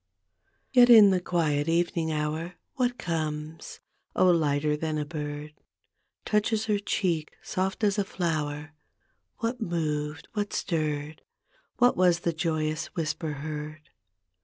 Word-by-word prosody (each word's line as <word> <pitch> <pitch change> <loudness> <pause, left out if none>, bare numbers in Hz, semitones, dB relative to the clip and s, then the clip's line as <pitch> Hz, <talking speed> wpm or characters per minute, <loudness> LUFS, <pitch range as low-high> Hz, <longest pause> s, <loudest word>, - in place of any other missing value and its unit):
Yet 245 -2 +7
in 215 -4 +9
the 185 -1 +1
quiet 155 -4 0
evening 165 -1 +1
hour 155 +3 -2 0.2
What 245 -1 0
comes, 155 -1 -4 0.3
oh, 185 - +5
lighter 150 -2 +2
than 155 0 -2
a 150 - -2
bird? 150 -1 -6 0.7
Touches 215 +1 +1
her 210 -2 +1
cheek, 175 -6 -1
soft 190 +3 -2
as 205 0 +2
a - - +3
flower. 155 -5 -3 0.7
What 235 +2 -2
moved, 155 -4 -2
what 205 -1 -2
stirred? 155 -2 -2 0.6
What 245 0 +4
was 175 -2 +3
the 170 - 0
joyous 155 -2 -1
whisper 160 -1 -2
heard? 155 0 -6
160 Hz, 125 wpm, -27 LUFS, 150-185 Hz, 0.7 s, in